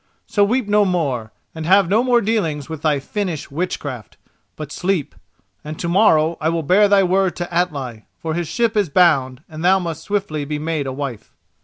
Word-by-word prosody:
So 210 -2 +2
weep 235 +2 +1
no 210 0 +4
more, 140 - -1 0.2
and 160 -1 -6
have 195 0 +5
no 215 +6 +2
more 245 -2 +3
dealings 180 -10 -1
with 160 -2 -7
thy 150 -3 +1
Finnish 170 -1 -4
witchcraft, 140 - -5 0.4
but 150 -2 -7
sleep; 180 -4 -1 0.5
and 155 +1 -7
to 170 - -3
morrow 170 -4 +3
I 160 - +1
will 165 -1 -1
bear 195 +7 +4
thy 200 -1 +4
word 190 0 +1
to 175 0 -5
Atli, 140 -10 -2
for 160 -1 -4
his 170 0 -2
ship 230 +6 0
is 205 -5 +1
bound 140 -5 +2
and 155 0 -8
thou 185 +2 +5
must 170 -4 -4
swiftly 195 -8 -2
be 150 +1 -3
made 155 -2 -2
a - - -2
wife." 130 -4 -6
170 Hz, 195 wpm, -20 LUFS, 150-195 Hz, 0.5 s, have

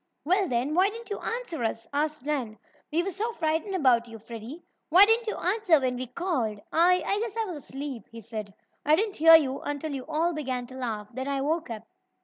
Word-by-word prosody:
"Well, 375 +4 +2
then, 255 +2 0
why 370 +4 +4
didn't 455 +1 -10
you 410 - -2
answer 460 - -3
us?" 225 0 -2
asked 300 -1 -1
Nan. 265 -7 -2 0.3
"We 330 +3 +1
were 390 - -3
so 445 +6 -3
frightened 320 0 -1
about 250 -8 +3
you, 230 -1 -9
Freddie. 230 +8 -9 0.3
Why 365 +5 +9
didn't 450 +2 +2
you 430 - -1
answer 365 -3 +3
when 255 -2 -1
we 255 +1 -4
called?" 250 - -2
"I 360 +2 +4
I 400 - +1
guess 450 -1 -4
I 450 - +1
was 355 -6 -5
asleep," 275 -2 -7
he 230 - -9
said. 215 -2 -6 0.3
"I 300 +2 +5
didn't 415 +2 -1
hear 325 +1 +9
you 275 -4 +3
until 290 +1 -4
you 265 -1 -5
all 320 +3 0
began 260 -5 -3
to 255 - -13
laugh. 225 -5 -4
Then 260 +2 -4
I 275 -1 -1
woke 320 +2 -1
up." 220 -2 -6
300 Hz, 220 wpm, -27 LUFS, 250-365 Hz, 0.3 s, Why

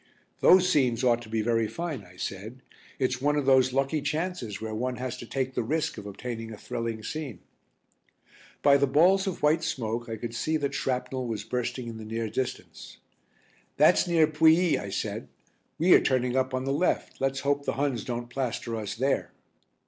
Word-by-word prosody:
"Those 185 0 +6
scenes 130 -9 +2
ought 120 -2 +3
to 115 - -11
be 110 -1 0
very 115 -1 +1
fine," 160 -5 -4
I 90 -1 -17
said. 110 +8 -6 0.3
"It's 130 -1 -1
one 145 +1 +2
of 145 -2 0
those 130 -1 +5
lucky 135 +3 0
chances 155 - -3
where 110 0 -5
one 125 +3 -2
has 125 0 -4
to 120 - -9
take 130 0 -2
the - - 0
risk 155 +7 -1
of 105 - -9
obtaining 115 +2 -6
a 110 - -8
thrilling 115 0 -4
scene." 145 - -5 1.3
By 140 -1 +6
the 140 0 +2
balls 180 +8 +4
of 185 - -4
white 155 +2 +3
smoke 120 -6 -3
I 115 - -3
could 115 +1 -6
see 155 +7 0
that 140 -2 -2
shrapnel 130 0 -2
was 110 -3 -3
bursting 125 +2 -3
in 115 -1 -6
the 110 - -8
near 115 0 -3
distance. 130 -1 -5 0.8
"That's - - +5
near 165 -2 +4
Pouilly," 160 +3 +4
I 100 - -6
said. - - -3 0.5
"We 175 +3 +5
are - - +7
turning 125 -1 +1
up 130 0 +1
on 130 0 -2
the 135 - 0
left, 165 -1 -1
let's 135 0 0
hope 140 0 0
the - - 0
Huns 130 -4 -1
don't 120 -1 -4
plaster 120 -3 -3
us 110 -1 -4
there." 135 +4 0
130 Hz, 195 wpm, -27 LUFS, 115-145 Hz, 1.3 s, are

